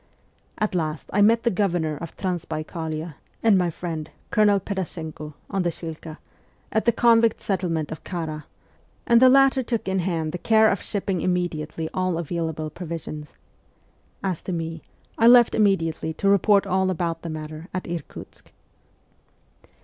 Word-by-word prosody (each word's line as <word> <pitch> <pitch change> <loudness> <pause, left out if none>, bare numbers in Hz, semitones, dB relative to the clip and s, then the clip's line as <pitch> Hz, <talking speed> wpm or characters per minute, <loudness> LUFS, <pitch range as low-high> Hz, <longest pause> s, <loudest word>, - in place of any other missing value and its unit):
At 215 -2 -1
last 155 -4 -3
I 205 - +3
met 230 +3 +5
the 235 - +2
Governor 175 -5 0
of 165 +3 -8
Transbaikalia, 160 -3 -4 0.3
and 225 -3 +5
my 180 -2 +2
friend, 165 -2 -5 0.2
Colonel 205 -2 +4
Pedashenko, 160 -6 -5 0.2
on 195 -1 0
the 175 - +1
Shilka, 160 -1 -7 0.5
at 220 - 0
the 235 - +5
convict 230 -2 +4
settlement 170 -6 -2
of 160 - -7
Kara, 160 -4 -5 0.6
and 235 0 +5
the 260 - +8
latter 270 0 +5
took 230 -4 -3
in 190 0 +1
hand 165 -3 -1
the 180 - -5
care 220 +2 +4
of 195 - -2
shipping 195 -3 -2
immediately 165 -3 -2
all 185 -2 0
available 160 -2 -3
provisions. 155 -3 -7 0.9
As 185 -4 -2
to - - -5
me, 165 -1 -4 0.4
I 230 - +6
left 240 -1 +7
immediately 165 -6 +1
to 200 - -1
report 200 +1 +4
all 190 0 +1
about 170 -2 -2
the 170 - -6
matter 155 +1 -7
at 185 - -4
Irkutsk. 170 -3 -8
175 Hz, 150 wpm, -24 LUFS, 160-200 Hz, 0.9 s, the